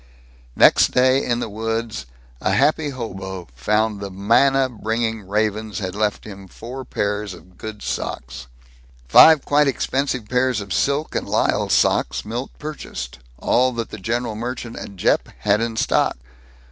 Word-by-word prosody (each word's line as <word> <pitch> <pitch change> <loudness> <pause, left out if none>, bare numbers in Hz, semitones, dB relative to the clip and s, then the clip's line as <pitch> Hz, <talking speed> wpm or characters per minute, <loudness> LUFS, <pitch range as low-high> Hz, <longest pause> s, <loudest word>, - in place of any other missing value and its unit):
Next - - +5
day, 130 +1 +4
in 120 -1 -1
the - - -2
woods, 110 - -3 0.3
a 95 - +1
happy 150 +4 +2
hobo 95 -8 -6
found 105 - 0
that 100 - -5
the - - -5
manna 125 +8 +3
bringing 110 -3 -3
ravens 105 +1 -1
had 95 -3 -3
left 105 0 -1
him 100 -2 -10
four 125 +8 -8
pairs 105 -3 -2
of 90 +2 -18
good 110 +2 -8
socks. 60 +1 -5 0.6
Five 155 - +8
quite 145 0 +3
expensive 135 -3 -1
pairs 125 -1 +1
of 100 -3 -5
silk 140 - 0
and - - -3
lisle - - +1
socks - - +2
Milt 120 +5 -4
purchased 65 - -7 0.2
all 125 - +2
that 115 -1 -4
the 110 - -7
general 115 +3 -2
merchant 120 +1 -5
at 100 - -8
Jeppe 90 - +1
had 105 +1 +2
in 115 -1 -2
stock. - - +1
110 Hz, 155 wpm, -21 LUFS, 100-125 Hz, 0.6 s, Five